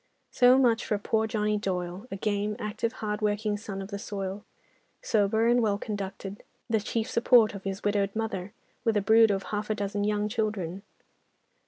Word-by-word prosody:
So 250 +1 +6
much 240 -4 +3
for 210 - 0
poor 220 +2 0
Johnny 210 -1 0
Doyle, 185 +1 -3
a - - -4
game, 210 +1 -1
active, 215 +2 -2
hardworking 210 0 0
son 200 -2 -6
of 195 - -9
the 200 -1 -5
soil; 195 0 -5 0.6
sober 220 +1 +2
and 240 +1 +4
well 210 -3 +1
conducted, 200 -1 -5 0.3
the 225 -2 +2
chief 220 +2 -2
support 235 -2 +4
of 200 -1 -9
his 195 0 -4
widowed 205 -1 0
mother, 205 -4 -3 0.3
with 225 -2 +2
a - - +2
brood 220 +3 +6
of 195 -1 0
half 210 +2 -4
a 215 - +1
dozen 205 0 -2
young 210 0 +1
children. 210 -5 -2
210 Hz, 175 wpm, -28 LUFS, 200-220 Hz, 0.6 s, So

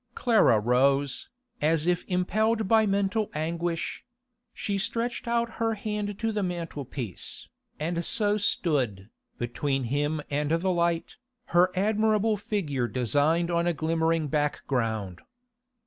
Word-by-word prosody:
Clara 220 - +4
rose, 135 +4 +2 0.3
as 155 +1 +2
if 180 0 +1
impelled 215 +4 +1
by 220 0 +4
mental 200 +2 +1
anguish; 165 +2 -2 0.5
she 200 -1 -2
stretched 235 +4 -2
out 235 0 +1
her 225 -1 +1
hand 210 -1 -3
to 225 0 -1
the 210 -1 -1
mantel 170 -6 -4
piece, 120 - -6 0.3
and 170 +2 -1
so 205 +3 +1
stood, 130 - 0 0.3
between 135 +3 -1
him 145 +2 0
and 145 +1 0
the 165 +4 +1
light, 170 -1 0 0.4
her 175 +1 +6
admirable 215 +2 +2
figure 160 - -2
designed 145 +8 +1
on 170 0 +1
a 175 - +2
glimmering 160 0 +1
background. 115 - -1
170 Hz, 125 wpm, -27 LUFS, 145-205 Hz, 0.5 s, her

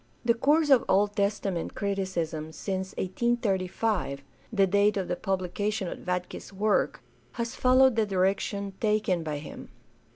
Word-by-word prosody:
The 235 - +5
course 295 +5 +2
of 265 - +6
Old 205 +2 +3
Testament 200 -4 -1
criticism 175 -6 -2
since 190 +3 -4
1835, 190 -7 -1 0.3
the 200 -4 +4
date 200 +2 +3
of 190 -2 -2
the - - -1
publica 190 +2 -2
tion 210 -3 -2
of - - -7
Vatke's 180 +2 -4
work, 205 +2 0 0.3
has 235 -2 -3
followed 255 0 +4
the 220 -2 +2
direction 195 +1 0
taken 210 -5 +1
by 155 -2 -3
him. 145 - -9
200 Hz, 140 wpm, -28 LUFS, 185-215 Hz, 0.3 s, of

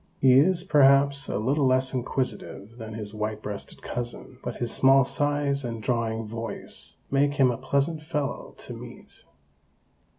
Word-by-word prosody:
He 130 -1 +6
is, 170 +7 +4
perhaps, 140 -3 +4
a - - -2
little 135 +6 +1
less 130 +1 +2
inquisitive 125 -3 -3
than 110 -1 -7
his 105 -1 -6
white 110 0 -3
breasted 100 -1 -7
cousin, 120 +1 -5
but 120 - -4
his 120 -2 -2
small 135 0 +5
size 145 0 0
and 115 -2 -4
drawling 115 -2 -1
voice 115 +1 -6 0.2
make 140 +1 +2
him 135 -3 +4
a - - -2
pleasant 145 +3 0
fellow 150 -4 -4
to - - -9
meet. - - -12
130 Hz, 155 wpm, -26 LUFS, 115-140 Hz, 0.2 s, He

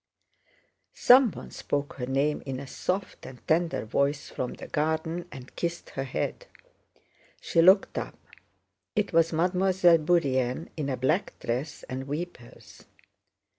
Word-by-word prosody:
Someone 250 -3 +4
spoke 145 0 -3
her 125 -2 -4
name 140 +3 0
in 130 -1 -3
a 140 - -7
soft 185 +8 -3
and 130 -1 -13
tender 165 -5 +1
voice 140 +5 -1
from 125 - -4
the - - -9
garden 160 +3 -1
and 130 -2 -11
kissed 170 0 -4
her 135 - -4
head. 130 - -3 0.9
She 165 - +2
looked 190 +3 +5
up. - - -7 0.8
It 210 -3 0
was 165 0 +4
Mademoiselle 180 0 +3
Bourienne 140 -4 +1
in 150 -3 -3
a 130 - -2
black 155 +10 0
dress 130 +6 -4
and 130 +1 -6
weepers. 145 -5 -8
155 Hz, 130 wpm, -27 LUFS, 135-175 Hz, 0.9 s, looked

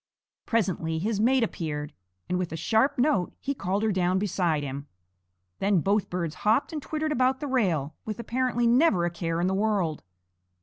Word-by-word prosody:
Presently 185 -8 0
his 205 +5 -1
mate 250 +3 +3
appeared, 150 -8 -3 0.3
and 180 - -1
with 180 -2 -3
a - - -3
sharp 225 - +2
note 245 - +1
he 280 - -2
called 200 -4 -2
her 220 - +2
down 185 -1 +1
beside 175 -6 0
him. 140 +1 -5 0.7
Then 195 -2 +3
both 200 +4 +1
birds 170 -3 -2
hopped 225 +9 +2
and 305 - -3
twittered 310 +1 -2
about 260 -1 +2
the - - -4
rail, 180 - 0
with 215 -1 -5
apparently 240 0 0
never 235 - +4
a 175 - -1
care 165 -1 -2
in 175 - +1
the 190 - +1
world. 195 -6 0
200 Hz, 180 wpm, -27 LUFS, 170-240 Hz, 0.7 s, never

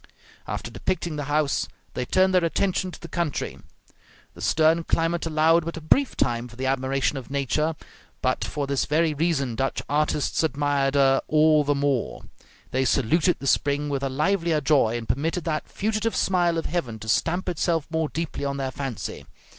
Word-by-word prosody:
After - - -4
depicting 175 -4 -2
the 145 -1 -3
house, 145 0 +1 0.3
they 125 - -2
turned 190 +6 +3
their 180 -1 +4
attention 185 +2 0
to - - -10
the 170 - -9
country. 170 -3 -3 0.7
The - - -12
stern 160 +2 +3
climate 165 +1 0
allowed 160 +1 +3
but 165 +1 -5
a - - -6
brief 265 - +2
time 120 0 0
for 120 - -14
the 130 +2 -4
admiration 135 +1 0
of 125 - -12
nature, 140 +3 0 0.4
but - - 0
for 145 - -3
this 140 -1 0
very 155 +1 +2
reason 145 -5 0
Dutch 135 +4 -2
artists 150 -1 0
admired 145 -3 +1
her 135 -1 +4
all 155 0 +4
the 145 0 +1
more; 140 -3 -1 0.5
they 130 +1 +1
saluted 150 +7 +2
the - - -8
spring 145 +2 +1
with 140 -1 -1
a 135 - -1
livelier 165 +3 +1
joy, 135 -6 +2
and 115 -1 -7
permitted 165 +5 -1
that 155 -2 -2
fugitive 215 +2 -1
smile 175 -3 +2
of 165 - -2
heaven 130 -11 -2
to 110 - -10
stamp 175 - +1
itself 165 -2 0
more 160 -2 0
deeply 165 -2 -4
on 140 0 -2
their 135 -1 -2
fancy. 135 -5 -5
150 Hz, 180 wpm, -25 LUFS, 135-165 Hz, 0.7 s, their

